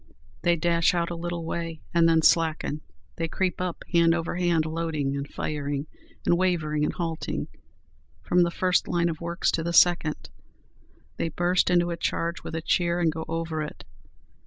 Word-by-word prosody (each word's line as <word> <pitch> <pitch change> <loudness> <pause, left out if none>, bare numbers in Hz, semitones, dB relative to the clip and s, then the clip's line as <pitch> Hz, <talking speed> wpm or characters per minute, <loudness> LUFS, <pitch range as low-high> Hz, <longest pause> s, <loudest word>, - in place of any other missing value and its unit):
"They 175 -1 +3
dash 170 +1 +2
out 170 0 0
a - - -3
little 170 0 -4
way, 165 -1 -4
and 165 -1 +5
then 160 -1 +3
slacken; 160 -2 +2 0.4
they 165 - -1
creep 180 +2 -1
up, 180 -2 -3
hand 170 -1 +4
over 170 0 -3
hand, 170 -3 +2
loading 160 -4 -2
and 140 0 -3
firing, 145 -1 -3 0.4
and 175 - +3
wavering 160 -5 +1
and - - +1
halting, 165 -2 -3 0.7
from 180 - +3
the 170 - +3
first 180 +1 +1
line 170 -1 +1
of 165 -1 -5
works 170 +1 0
to 165 - -1
the 170 +1 -2
second; 170 -3 +3 0.9
they 165 - -1
burst 175 +4 +1
into 175 -1 +3
a 170 - -3
charge 170 0 -2
with - - -6
a 165 - -3
cheer, 170 0 +1
and 165 -2 +2
go 160 +1 -5
over 165 -1 -2
it. 150 - -7
165 Hz, 180 wpm, -26 LUFS, 160-175 Hz, 0.9 s, and